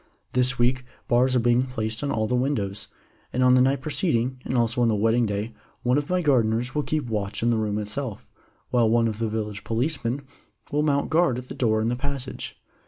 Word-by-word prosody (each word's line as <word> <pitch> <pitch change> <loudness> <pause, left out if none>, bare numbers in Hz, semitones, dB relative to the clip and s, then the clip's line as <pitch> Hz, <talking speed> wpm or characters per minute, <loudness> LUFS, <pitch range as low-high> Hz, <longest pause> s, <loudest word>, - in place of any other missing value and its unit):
This 125 +1 +2
week 125 +2 +2 0.2
bars 125 +2 +3
are - - +4
being 120 +1 +3
placed 115 -2 -3
on 145 - -1
all 110 -1 0
the 110 - -2
windows, 125 -6 -1 0.4
and 130 - +1
on 125 0 +6
the 130 - +6
night 135 +1 +2
preceding, 130 -4 -1
and 130 - -1
also 120 +1 +2
on 120 - +4
the 110 - +2
wedding 115 +3 +2
day, 105 +3 -3 0.3
one 125 +3 +3
of 145 - -6
my 180 0 +1
gardeners 125 -3 +2
will 150 - +1
keep 155 -1 -1
watch 105 -2 -3
in 120 - +3
the 115 - +2
room 105 -1 -1
itself, 105 +2 -4 0.4
while 120 -3 +3
one 115 0 +3
of 110 -1 -4
the 115 -1 0
village 105 -1 -4
policemen 125 +2 -1 0.5
will 150 - +1
mount 145 -1 +1
guard 160 -6 +3
at 125 0 -8
the - - -5
door 110 -3 +1
in 110 - +1
the 120 - 0
passage. 135 0 -5
120 Hz, 220 wpm, -25 LUFS, 110-130 Hz, 0.5 s, on